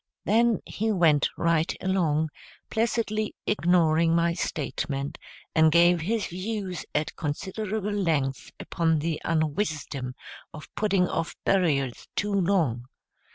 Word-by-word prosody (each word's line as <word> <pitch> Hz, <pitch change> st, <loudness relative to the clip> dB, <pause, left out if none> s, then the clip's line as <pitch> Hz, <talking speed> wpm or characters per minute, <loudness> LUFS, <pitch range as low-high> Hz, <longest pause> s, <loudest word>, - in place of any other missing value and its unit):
Then 230 Hz, +2 st, +3 dB
he 220 Hz, +1 st, -1 dB
went 165 Hz, -7 st, +3 dB
right 165 Hz, -1 st, +1 dB
along, 160 Hz, -5 st, +1 dB, 0.4 s
placidly 220 Hz, -1 st, 0 dB
ignoring 165 Hz, -4 st, +3 dB
my 170 Hz, 0 st, +2 dB
statement, 140 Hz, -4 st, -3 dB, 0.3 s
and 160 Hz, -1 st, +5 dB
gave 170 Hz, +1 st, +5 dB
his 215 Hz, +5 st, -1 dB
views 185 Hz, -1 st, -4 dB
at 150 Hz, 0 st, -1 dB
considerable 200 Hz, +7 st, -3 dB
length 155 Hz, -9 st, 0 dB
upon 165 Hz, -1 st, 0 dB
the 155 Hz, +1 st, -2 dB
unwisdom 155 Hz, -5 st, -2 dB, 0.4 s
of 150 Hz, -, -11 dB
putting 195 Hz, -4 st, +2 dB
off 165 Hz, -, -3 dB
burials 145 Hz, -10 st, +1 dB
too 205 Hz, 0 st, -1 dB
long. 170 Hz, -, +1 dB
170 Hz, 110 wpm, -26 LUFS, 155-200 Hz, 0.4 s, and